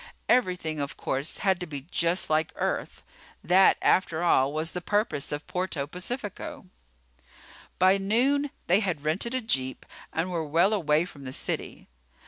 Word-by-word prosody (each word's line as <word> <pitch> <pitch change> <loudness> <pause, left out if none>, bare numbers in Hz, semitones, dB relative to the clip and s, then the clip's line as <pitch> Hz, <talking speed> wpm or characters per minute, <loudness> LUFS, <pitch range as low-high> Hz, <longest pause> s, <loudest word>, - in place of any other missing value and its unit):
Everything, 180 -10 +1
of 140 0 -4
course, 135 +4 -2
had 190 -2 +1
to 180 - -5
be 145 -3 -6
just 170 +2 +1
like 155 +1 +1
Earth. - - -3 0.4
That, 190 +2 +5
after 170 -3 +2
all, 135 -5 +3
was 155 +2 -2
the 180 - -5
purpose 205 -8 0
of 145 +1 -4
Puerto 180 -6 -2
Pacifico. 225 - -5 1.1
By 190 +2 +5
noon 260 +9 +2 0.2
they 180 +4 +4
had 180 -9 -2
rented 195 +11 0
a 255 - 0
jeep 130 - -2 0.3
and 170 +3 -2
were 170 -2 -1
well 170 +7 +3
away 160 -5 +2
from 145 -6 -12
the 130 - -5
city. - - -3
175 Hz, 155 wpm, -27 LUFS, 155-200 Hz, 1.1 s, That